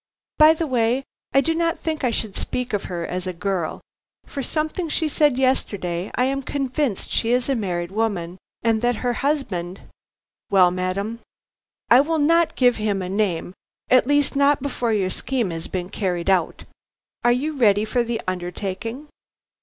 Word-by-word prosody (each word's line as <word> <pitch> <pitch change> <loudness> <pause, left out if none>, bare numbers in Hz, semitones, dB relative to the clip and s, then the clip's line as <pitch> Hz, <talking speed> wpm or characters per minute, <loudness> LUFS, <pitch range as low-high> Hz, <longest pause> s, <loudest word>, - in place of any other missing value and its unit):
By 310 +1 +8
the 330 - -1
way, 250 -1 +1 0.3
I 275 - +5
do 325 +3 0
not 335 0 0
think 315 -3 -3
I 250 - +3
should 220 -3 -1
speak 250 -2 -3
of 205 - -1
her 170 -2 -4
as 180 +1 -4
a 185 - -2
girl. 180 -3 -2 0.4
From 280 - -5
something 310 +5 -2
she 315 +1 0
said 295 -3 +2
yesterday 200 -9 0
I 250 - +2
am 275 +1 -1
convinced 270 -4 -2
she 230 - +1
is 245 0 +2
a 275 - +2
married 180 -5 -2
woman; 190 -5 -2 0.2
and 225 -2 +2
that 245 0 +2
her 245 - +2
husband 210 - -2 0.3
" - - -71
"Well, 185 -3 +5
madam?" 190 +5 -2 0.7
"I 245 +3 +9
will 320 +3 0
not 330 +3 +3
give 245 -2 +3
him 205 -3 -1
a 180 - -4
name, 190 -3 -1 0.4
at 255 0 +5
least 290 -1 +2
not 280 -1 +3
before 250 -4 -1
your 195 -4 +1
scheme 240 -6 -1
has 165 0 -5
been 180 -1 -4
carried 180 -2 -1
out. 180 -4 0 0.6
Are 240 - +5
you 285 +6 0
ready 210 -5 +3
for 240 +2 +1
the 230 -1 -2
undertaking?" 190 +8 -4
230 Hz, 175 wpm, -22 LUFS, 185-275 Hz, 0.7 s, I